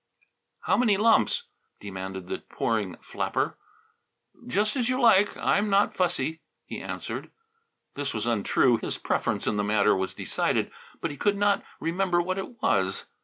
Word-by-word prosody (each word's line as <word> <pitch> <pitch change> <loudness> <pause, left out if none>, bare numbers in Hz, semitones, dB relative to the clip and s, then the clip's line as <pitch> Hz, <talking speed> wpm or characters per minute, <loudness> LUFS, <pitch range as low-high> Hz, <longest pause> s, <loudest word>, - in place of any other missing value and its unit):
"How - - +2
many 225 -5 +3
lumps?" 225 +2 +3 0.4
demanded 95 -2 -6
the - - -3
pouring 105 -6 -2
flapper. - - -2 0.9
"Just 210 - +1
as 245 -3 0
you 255 0 +1
like; 210 -5 +5
I'm 205 +1 +1
not 200 +1 +3
fussy," 160 -3 0 0.2
he - - -6
answered. - - -5 0.6
This 140 -1 -3
was 110 0 -3
untrue. 120 +2 +3
His - - -4
preference - - -1
in 105 - 0
the 105 - +1
matter 105 0 +3
was 95 0 -2
decided, - - -1 0.3
but 165 - -2
he 145 - -8
could 205 +7 +1
not 205 0 +2 0.2
remember 175 +1 +1
what 185 +2 -1
it 225 +4 -8
was. 95 +1 +1
165 Hz, 155 wpm, -27 LUFS, -, 0.9 s, like